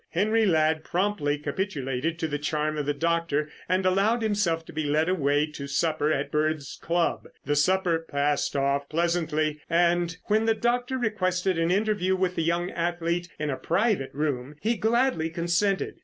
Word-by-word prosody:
Henry 215 +5 +2
Ladd 155 -2 +2
promptly 175 -6 0
capitulated 150 -2 -2
to 160 - -2
the 145 -1 -3
charm 150 +1 -1
of 150 -2 -3
the 145 - +1
doctor 165 -2 0 0.2
and 185 +1 +1
allowed 200 +5 +2
himself 195 -7 0
to - - -12
be 155 - -2
led 150 +2 +1
away 145 -5 +2
to 140 -2 -7
supper 155 +1 0
at 140 -1 -1
Bird's 150 -2 -1
club. 170 0 0 0.2
The 145 +2 +1
supper 175 +2 +2
passed 145 -3 -1
off 140 0 0
pleasantly, 155 -2 0
and 170 0 +2
when 215 +1 +1
the 225 0 +3
doctor 245 +3 0
requested 185 -6 0
an 165 0 +1
interview 195 -1 +1
with 185 -1 0
the - - 0
young 170 +2 0
athlete 170 0 -2
in 150 -1 -2
a 130 - -3
private 190 - 0
room, 140 -1 -2
he 225 +6 0
gladly 230 -7 +1
consented. 175 +4 0
165 Hz, 170 wpm, -26 LUFS, 150-190 Hz, 0.2 s, the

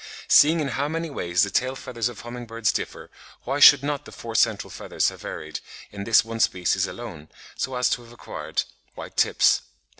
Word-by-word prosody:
Seeing 160 +3 +6
in 140 - -1
how 140 +3 -1
many 165 +1 -3
ways 90 -6 +1
the 100 - -1
tail 130 +6 0
feathers 120 -3 -3
of 120 - -10
humming 120 0 -8
birds 115 -1 0
differ, - - -5 0.3
why 135 +3 -2
should 145 -1 +9
not 145 0 -2
the - - -11
four 115 -1 -8
central 110 -2 +1
feathers - - -1
have - - -12
varied - - -6 0.3
in 100 -1 -7
this 115 -1 +5
one 115 0 -6
species 90 -5 +1
alone, 75 +1 -9 0.3
so 130 0 -3
as 125 0 +2
to 120 - -1
have 115 - -16
acquired 120 - -4 0.3
white - - -9
tips? - - +3
120 Hz, 200 wpm, -24 LUFS, 110-140 Hz, 0.3 s, should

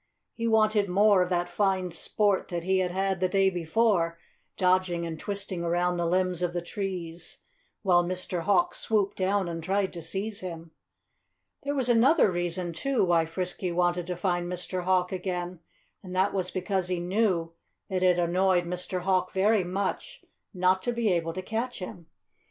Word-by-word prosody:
He 230 0 -2
wanted 215 -2 +3
more 200 +1 +5
of 180 - 0
that 175 -1 0
fine 185 0 0
sport 205 +2 0
that 170 -1 -4
he 190 +1 +2
had 185 -1 +1
had 190 0 -1
the 185 0 +1
day 195 0 +3
before, 175 0 +1 0.4
dodging 180 -2 +2
and 160 -2 -5
twisting 200 -3 -4
around 175 +1 +1
the 170 -1 0
limbs 180 0 +1
of 175 -1 0
the 175 - -1
trees, 175 -3 -5 0.4
while 175 -3 +4
Mr. 180 0 -3
Hawk 180 -1 +2
swooped 205 -3 0
down 190 0 +1
and 165 -1 -5
tried 195 +2 0
to 170 - -6
seize 200 +6 -3
him. 165 -3 -7 0.9
There 285 +1 -2
was 260 -3 0
another 240 - +5
reason, 175 0 -2
too, 260 +5 +1
why 170 -2 +3
Frisky 180 +2 -3
wanted 175 0 +1
to 180 - -2
find 175 -1 -1
Mr. 180 0 -3
Hawk 180 -1 +2
again 180 -1 -3 0.4
and 185 -1 -8
that 190 +2 +2
was 185 -2 -1
because 185 0 -1
he 180 -1 -1
knew 175 -2 0 0.3
that 185 -2 -2
it 180 -1 +4
annoyed 180 +1 +2
Mr. 180 +1 -3
Hawk 185 0 +1
very 205 +1 +3
much 190 +2 -4 0.3
not 185 -1 +2
to 240 - -1
be 230 -3 +1
able 165 -2 0
to 185 - -5
catch 230 +5 -3
him. 180 -3 -8
185 Hz, 175 wpm, -28 LUFS, 175-195 Hz, 0.9 s, more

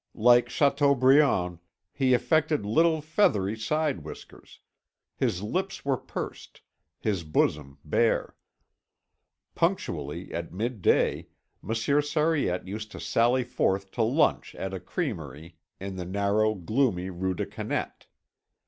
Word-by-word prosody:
Like 120 +1 +5
Chateaubriand, 140 - +3 0.3
he 130 -2 +3
affected 155 -3 +1
little 160 +8 +3
feathery 110 - +1
side 140 - -1
whiskers. 75 - -12 0.6
His 90 - -1
lips 185 - -3
were 140 -1 +2
pursed, - - -7 0.4
his 100 -6 -1
bosom 75 -2 0
bare. 115 +10 +1 1.2
Punctually 75 +5 -2
at 85 -1 -4
midday 110 +1 0 0.3
Monsieur 115 +7 +1
Sariette 145 - 0
used 105 +2 -6
to - - -8
sally 120 +2 +2
forth 95 -5 -1
to 120 - -2
lunch 135 +7 +1
at 95 0 -5
a 95 - -4
crèmerie 85 -2 -5 0.3
in 95 0 -6
the 90 - -4
narrow 100 +3 +1
gloomy 95 -1 0
Rue 95 +1 -2
des - - -2
Canettes. - - -5
110 Hz, 115 wpm, -27 LUFS, 95-140 Hz, 1.2 s, Like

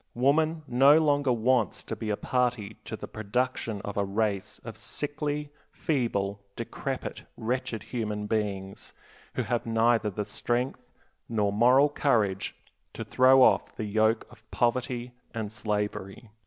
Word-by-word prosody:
Woman 155 +5 +2
no 135 +5 +6
longer 145 -4 +3
wants 120 -2 +1
to - - -5
be 110 - -5
a 105 - 0
party 125 -5 0
to - - -4
the - - -7
production 110 0 -2
of 100 +1 -6
a 100 - +2
race 100 -1 -1
of - - -7
sickly, 145 0 -4 0.2
feeble, 100 -9 -1
decrepit, - - -4
wretched 115 -1 -2
human 105 -4 -3
beings, 100 -3 -3 0.4
who - - 0
have 120 -1 -1
neither 115 -1 +3
the 105 +1 -3
strength 120 +5 -2 0.4
nor 105 -3 +1
moral 125 +6 +6
courage 110 -10 +1 0.4
to - - -5
throw 130 +1 +6
off - - +3
the 110 - -3
yoke 110 +2 +2
of 115 -2 -16
poverty 125 0 0 0.2
and 110 -2 -3
slavery. 105 0 -3
115 Hz, 140 wpm, -28 LUFS, 105-130 Hz, 0.4 s, no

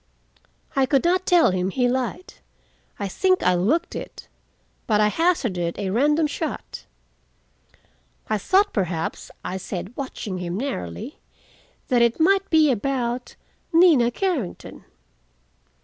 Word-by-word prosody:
I 270 -1 +3
could 275 0 +2
not 370 +2 +1
tell 345 - +5
him 185 0 -1
he 245 +5 +1
lied. 260 +8 -3 0.6
I 200 - -3
think 370 - +1
I 180 - +4
looked 240 - 0
it. - - -8 0.6
But 210 -2 +2
I 210 0 +4
hazarded 220 - 0
a 195 -2 -2
random 295 +8 +2
shot. 300 +2 -5 1.4
"I 215 -1 0
thought 395 - +2
perhaps," 175 -5 -2 0.2
I 185 - -3
said, 190 +4 -6
watching 220 -8 -5
him 175 0 -4
narrowly, 215 - -5 0.7
"that 245 -3 +3
it 235 +3 +2
might 390 +4 +3
be 310 -3 +5
about—Nina 255 - +1
Carrington." 285 - -4
250 Hz, 120 wpm, -23 LUFS, 195-325 Hz, 1.4 s, tell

